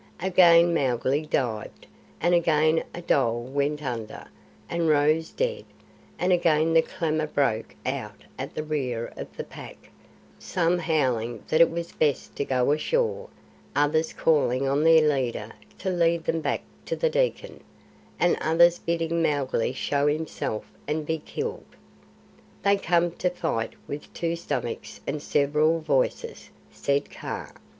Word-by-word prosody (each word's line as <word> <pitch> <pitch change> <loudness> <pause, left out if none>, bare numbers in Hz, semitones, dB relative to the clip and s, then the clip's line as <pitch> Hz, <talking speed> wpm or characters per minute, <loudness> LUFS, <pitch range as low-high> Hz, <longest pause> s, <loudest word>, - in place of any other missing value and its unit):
Again 175 -2 +5
Mowgli 135 +1 0
dived, 115 -7 -2 0.3
and 175 +2 +2
again 160 -1 +3
a 175 - -8
dhole 120 -6 +1
went 140 +3 -1
under, 115 -5 -5 0.4
and 170 -1 0
rose 155 +2 +3
dead, 485 -1 -2 0.5
and 180 +1 +2
again 165 -2 +3
the 165 - +6
clamour 155 -2 -2
broke 135 -7 -1
out 125 -6 -4 0.2
at 135 - -5
the 155 - -2
rear 130 -7 -3
of - - -9
the - - -3
pack; - - -12 0.5
some 175 0 0
howling 125 -9 0
that 155 - +4
it 170 - +7
was 170 0 -5
best 145 -3 0
to - - 0
go 130 0 +1
ashore, 480 - 0 0.5
others 155 +2 +2
calling 135 -4 +2
on 140 +2 +1
their 160 -1 +6
leader 125 -6 -1 0.3
to 190 - -2
lead 170 -2 +2
them 165 0 -1
back 140 -2 -1 0.3
to - - -1
the - - +1
Dekkan, - - -1 0.6
and 175 - +3
others 170 +2 +4
bidding 165 0 -1
Mowgli 140 -7 0
show 140 +2 0
himself 150 -7 -2 0.2
and 150 +1 -1
be 160 +1 -1
killed. 455 - -6 0.9
"They 200 0 +4
come 175 -2 +2
to 180 +1 -1
the 180 - -13
fight 115 -8 -2
with 145 - -7
two 170 0 -1
stomachs 170 - -4
and 150 - -3
several 150 +3 +2
voices," 145 -5 -1 0.2
said 140 0 -1
Kaa. - - -6
155 Hz, 145 wpm, -26 LUFS, 140-170 Hz, 0.9 s, it